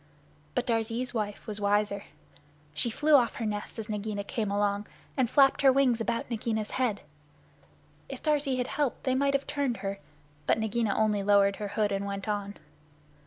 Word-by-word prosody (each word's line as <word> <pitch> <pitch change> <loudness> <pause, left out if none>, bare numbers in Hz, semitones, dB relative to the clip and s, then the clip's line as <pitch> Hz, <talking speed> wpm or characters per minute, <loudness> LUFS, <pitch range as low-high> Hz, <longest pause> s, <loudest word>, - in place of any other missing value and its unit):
But 250 - +1
Darzee's 230 +2 -1
wife 210 -3 -3
was 210 -2 -4
wiser. 205 0 +1 0.7
She 155 +11 0
flew 300 +7 +1
off 245 -5 +5
her 230 - -3
nest 210 +1 -4
as 220 -1 -5
Nagaina 210 -1 -3
came 215 0 -2
along, 205 0 0 0.3
and 255 -3 +2
flapped 270 0 +5
her 270 -1 +7
wings 255 -4 +3
about 230 +1 -1
Nagaina's 220 -2 -2
head. 245 -6 0 1.1
If - - -7
Darzee 290 -4 +1
had 250 - 0
helped 280 0 -2
they 260 - +1
might 275 +1 +2
have 275 - 0
turned 280 -5 -1
her, 195 0 -3 0.5
but - - +4
Nagaina 220 -1 0
only 215 -2 +2
lowered 200 0 +4
her 210 - -3
hood 205 0 0
and 200 0 -1
went 200 0 -4
on. 205 -1 -3
220 Hz, 175 wpm, -29 LUFS, 205-255 Hz, 1.1 s, her